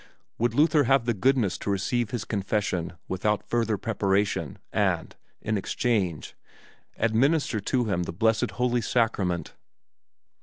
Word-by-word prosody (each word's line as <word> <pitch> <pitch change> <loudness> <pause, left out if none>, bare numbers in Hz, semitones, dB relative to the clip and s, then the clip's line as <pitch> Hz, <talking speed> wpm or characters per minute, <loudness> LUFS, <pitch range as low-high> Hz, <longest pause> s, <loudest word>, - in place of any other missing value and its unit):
Would 120 0 +1
Luther 150 -1 +4
have 135 -1 +3
the 120 - +1
goodness 115 -2 +1
to - - -4
receive 105 +4 0
his 120 -1 -4
confession 100 -4 -1
without 100 +2 0
further 115 -3 0
preparation 100 -1 0 0.2
and, - - 0 0.3
in 110 -2 0
exchange, 95 - -1 0.6
administer 120 +2 +2
to 120 +4 0
him 95 -5 0
the 90 - -3
blessed 110 +5 +1
Holy 125 -1 +1
Sacrament? 100 -8 0
110 Hz, 125 wpm, -26 LUFS, 100-120 Hz, 0.6 s, Luther